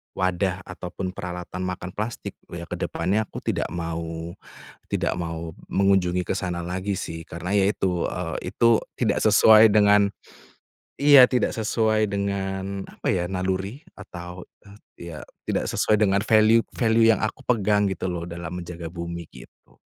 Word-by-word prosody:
wadah 95 0 -1
ataupun 90 0 -6
peralatan 90 0 -6
makan 90 0 -5
plastik 110 +5 -5
loh - - -9
ya - - -7
ke - - -4
depannya 105 +3 -1
aku - - -9
tidak - - -1
mau 85 -1 -5 0.6
tidak - - 0
mau 85 -1 -5 0.2
mengunjungi 95 -2 +2
ke 95 - -1
sana 90 -2 -3
lagi 95 +3 -3
sih, 80 0 -6
karena 90 +5 -4
ya 100 0 +4
itu 90 -4 -1 0.4
itu 115 -1 +3 0.2
tidak - - +1
sesuai 110 0 +7
dengan 105 -1 +5 0.9
iya 145 -2 +8
tidak 125 0 +1
sesuai 110 -1 +1
dengan 100 -1 -3
apa - - -6
ya, 90 -1 0
naluri 95 - -3 0.2
atau 90 -2 -9 0.2
eee, 100 -4 -13
ya, 75 - -7 0.3
tidak - - -1
sesuai 105 - +2
dengan 100 -1 +3
value-value 110 +1 +3
yang 110 - +1
aku 110 +5 -3
pegang 105 -3 +2
gitu 95 - -3
loh 85 -1 -4
dalam 85 +1 -6
menjaga 85 -1 -7
bumi 85 -1 -6
gitu. - - -17
95 Hz, 150 wpm, -24 LUFS, 90-105 Hz, 0.9 s, iya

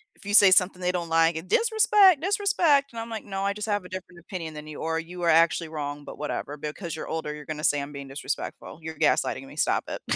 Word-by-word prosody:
if - - -17
you 205 - -3
say 200 -2 +8
something 185 0 +4
they 180 0 +1
don't 175 -2 -3
like, 165 +1 +2
"Disrespect, 420 - +4
disrespect," 355 -7 +2
and 230 - -7
I'm 225 +1 -6
like, 220 -2 -5
"No, 195 -1 -4
I 200 0 0
just 210 +1 -5
have 205 -2 -1
a - - -11
different 185 -1 -8
opinion 170 -3 -7
than 150 0 -9
you, 155 - -8
or 160 0 -1
you 175 +2 -8
are 170 - +2
actually 165 0 +3
wrong, 145 -2 -5
but - - -10
whatever, 150 0 -4
because 155 +3 -6
you're - - -6
older, 160 -2 -4
you're 150 -1 -10
gonna 155 0 -6
say 145 -1 +2
I'm 140 +1 -8
being 140 -1 -8
disrespectful. 140 +3 -5
You're 160 -1 -7
gaslighting - - +1
me, - - -13
stop - - +1
it." - - -6
175 Hz, 250 wpm, -26 LUFS, 155-205 Hz, -, say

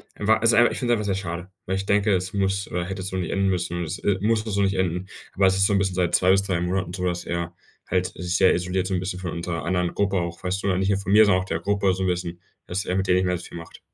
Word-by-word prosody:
er 105 - -5
war 110 0 +4
ist 115 0 +4
einfach, 120 +1 +5
ich - - -4
finde 120 -2 +1
es - - +2
einfach 105 - -3
sehr 100 -2 0
schade, 90 -1 -5 0.2
weil 95 +1 -1
ich 95 - -4
denke, 105 +1 +2
es 90 +1 -3
muss 100 0 0
oder 90 0 -2
hätte 95 0 -5
so 95 0 -5
nicht 90 -3 -2
enden 100 0 +1
müssen, 85 -1 -1
es, 80 +2 -4
äh, 100 -2 +1
muss 110 +1 +2
das 110 -2 -5
so 100 - +1
nicht 95 0 +1
enden, 90 0 -1 0.3
aber 95 0 +3
es 95 - +3
ist 95 - +4
so 100 - +2
'n 100 - +3
bisschen 95 -2 0
seit 90 -2 0
2 90 - +3
bis 95 +1 +4
3 90 -3 -1
Monaten 90 0 -2
so, 90 -1 -3
dass 90 0 -3
er 85 0 -3 0.3
halt 90 0 +1
sich 90 0 -2
sehr 95 - +5
isoliert 90 +1 -1
so 95 - -2
'n 90 - +1
bisschen 90 0 -4
von 90 -3 -4
unserer 85 -1 -4
anderen 90 0 0
Gruppe 100 -1 +1
auch, 85 -1 -4
weißt 95 +2 -1
du, - - -1
nicht 95 +1 0
nur 100 - +2
von 100 - -4
mir, 110 +1 +7
sondern 95 -2 +3
auch - - -6
der - - -2
Gruppe 100 -1 +1
so 95 - -3
'n - - +1
bisschen, 90 -1 -3 0.3
dass 95 +3 -2
er 90 - -1
mit 95 0 0
denen 90 - +4
nicht 95 - +1
mehr 90 -1 0
so 85 - -10
viel - - -9
macht. 85 -1 -11
95 Hz, 325 wpm, -24 LUFS, 90-100 Hz, 0.3 s, mir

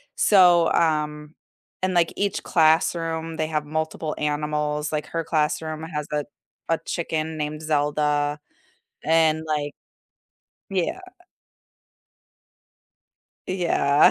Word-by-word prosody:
so, 180 -4 +5
um 150 -2 0 0.5
and 185 0 +1
like 170 -2 +3
each 200 -1 -1
classroom, 165 0 +2
they 155 - 0
have 155 -1 -1
multiple 155 0 -3
animals, 150 0 -1
like 150 -1 -1
her 165 0 -3
classroom 155 0 -1
has 150 -2 -4
a 150 0 0 0.5
a 165 - +3
chicken 160 -2 -2
named 150 0 -3
Zelda, 150 -1 0 0.7
and, 160 0 +3
like 145 -2 -1 1.0
yeah. 190 - -1 2.5
Yeah, 170 -6 +4
155 Hz, 100 wpm, -24 LUFS, 150-165 Hz, 2.5 s, so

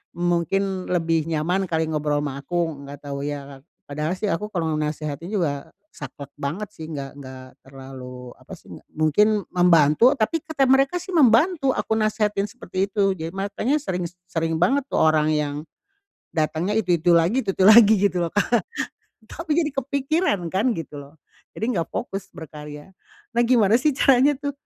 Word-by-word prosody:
mungkin 180 +2 -1
lebih 165 -3 +1
nyaman 175 +5 0
kali, 160 -1 0
ngobrol 150 -1 0
ama 140 -1 -5
aku. 160 -2 -3
Nggak 140 0 -10
tahu, 140 0 -5
ya. 140 -2 -6 0.3
Padahal 150 +4 -2
sih 210 - -2
aku 210 +6 -3
kalau 160 -4 -1
nasehatin 150 +2 -4
juga 150 -9 -2 0.2
saklek 140 0 -9
banget, 160 +9 -4
sih. 160 -4 -9
Nggak 140 -3 -6
nggak 130 -1 -10 0.2
terlalu, 130 -2 -10
apa - - -13
sih, - - -20
nggak - - -16
mungkin 155 +7 +3 0.2
membantu, 175 - +5
tapi 290 +9 0
kata 315 -6 -1
mereka 270 +6 +3
sih, 380 - -8
membantu, 275 +2 +4
aku 220 - -1
nasehatin 210 -2 0
seperti 190 +1 -3
itu. 195 -1 +1
Jad 160 +1 -5
makanya 215 +8 -1
sering, 180 -9 -3
s 180 - -28
sering 165 -1 -1
banget 270 +9 +3
tuh - - +1
orang 155 -1 +3
yang, 145 -1 -1 0.8
datangnya 160 +5 -1
itu-itu 175 -4 +1
lagi, 180 +11 +3
itu-itu 190 -1 0
lagi, 220 0 +8
gitu 180 -1 -4
loh, 165 - -2
Kak. 205 +3 0 0.8
Tapi 330 -2 -4
jadi 310 -3 +1
kepikiran, 275 - 0
kan, 210 +7 +1
gitu 150 -3 -7
loh. 140 +2 -14 0.4
Jadi 230 -1 -2
nggak 165 - -2
fokus 195 0 -5
berkarya. 150 +1 -10 0.5
Nah, 240 - +4
gimana 225 -4 +4
sih, 300 +1 +2
caranya 275 +2 +4
tuh, 285 0 -3
175 Hz, 165 wpm, -23 LUFS, 150-215 Hz, 0.8 s, lagi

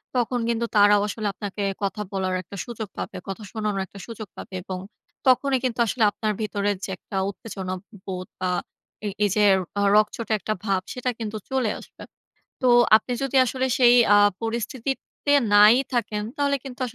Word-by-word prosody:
তখন 245 0 +1
কিন্তু 235 0 0
তারাও 205 0 +6
আসলে 210 0 -3
আপনাকে 200 +1 -5 0.2
কথা 200 +1 -2
বলার 190 -1 -1
একটা 185 +3 -11
সুযোগ 225 -3 -6
পাবে। - - -5
কথা 195 +3 -6
শোনানোর 210 -3 -2
একটা 200 - -13
সুযোগ 225 -2 -7
পাবে। 190 - -8
এবং 185 0 -5 0.5
তখনই 265 +1 +4
কিন্তু 250 -2 -1
আসলে 225 +1 0
আপনার 215 +1 -2
ভিতরে 205 -1 -1
যে - - -4
একটা 195 - -7
উত্তেজনা 190 -2 -6 0.3
বোধ 185 -1 -5
বা 185 -1 0 0.5
এই, 205 - -1
এই, 205 - +3
যে 210 -1 +4 0.3
অ - - +2
রগচটা 215 +1 +2
একটা 215 - -2
ভাব 195 -3 +1
সেটা 250 0 -2
কিন্তু 215 -1 -4
চলে 260 -4 +1
আসবে। - - -13 0.6
তো 255 - +4 0.3
আপনি 225 +3 -3
যদি 270 0 -1
আসলে 260 +2 -1
সেই 245 -2 +7 0.2
আ - - +7 0.2
পরিস্থিতিতে 240 +5 -3 0.2
নাই 210 +2 +8 0.2
থাকেন 220 -3 -1
তাহলে 280 -1 +1
কিন্তু 265 -1 -9
215 Hz, 170 wpm, -24 LUFS, 200-245 Hz, 0.6 s, নাই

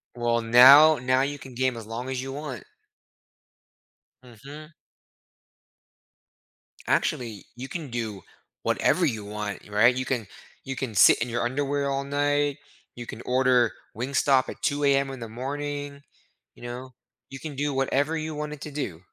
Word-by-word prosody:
Well, 120 -1 0
now 135 +7 +8
now 130 +1 +2
you 145 +1 -2
can 130 -3 -12
game 130 -1 0
as 110 -2 -9
long 120 +3 -5
as 130 -1 -3
you 135 0 -6
want. 140 -6 -7 1.6
Mhm. 140 +7 -12 2.2
Actually, 115 -5 -1
you 130 +2 -7
can 160 -5 -6
do 110 -5 -4 0.4
whatever - - +2
you 110 -2 -2
want, 105 -1 -5
y - - -16
right? 115 +4 +5
You 130 0 -2
can 120 -7 -2 0.4
you 135 0 -4
can 120 -6 -5
sit 95 - +7
in 120 +1 -2
your 120 +1 -1
underwear 140 +2 -1
all 135 0 -1
night. 145 0 0 0.4
You 120 -1 -7
can 115 - -8
order 125 -2 +3 0.3
Wingstop 130 +1 +2
at - - -9
2:00 140 -2 +2
in 135 -2 -7
the 115 - -5
morning, 145 +3 -5 0.5
you - - -16
know? 125 +2 -7 0.4
You 135 - -9
can 150 -2 -7
do 145 +1 -1
whatever 140 +4 0
you 155 -1 -4
wanted 150 -1 -5
to 150 - -7
do. 95 - -5
130 Hz, 155 wpm, -26 LUFS, 120-145 Hz, 2.2 s, now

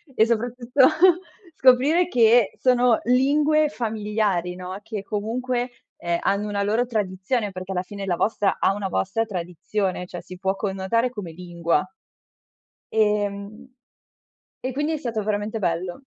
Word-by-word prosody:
e 220 - +5
soprattutto 245 +3 +2 0.7
scoprire 275 +7 +4
che 235 - +4
sono 250 -2 +4
lingue 295 +4 +3
familiari 210 - -1
no, 185 +1 -6
che 220 -3 -5
comunque, 240 +4 -2 0.3
ehm, 170 0 -1
hanno 200 +1 0
una 200 -1 -1
loro 220 +5 +1
tradizione, 205 0 -2
perché 185 0 -7
alla 180 -1 -1
fine 200 +1 -7
la 180 - 0
vostra 205 0 +1
ha 195 - +3
una 200 -1 -3
vostra 185 - 0
tradizione, 180 0 -3
cioè 175 - -7
si 185 - -11
può 190 +1 0
connotare 195 +5 0
come 200 -8 -7
lingua. 170 -1 -1 1.1
Ehm 210 +1 0 1.0
e 260 - -2
quindi 295 +4 -1
è 315 - 0
stato 230 -6 -3
veramente 210 +1 -2
bello. 175 +4 -2
210 Hz, 135 wpm, -23 LUFS, 190-245 Hz, 1.1 s, e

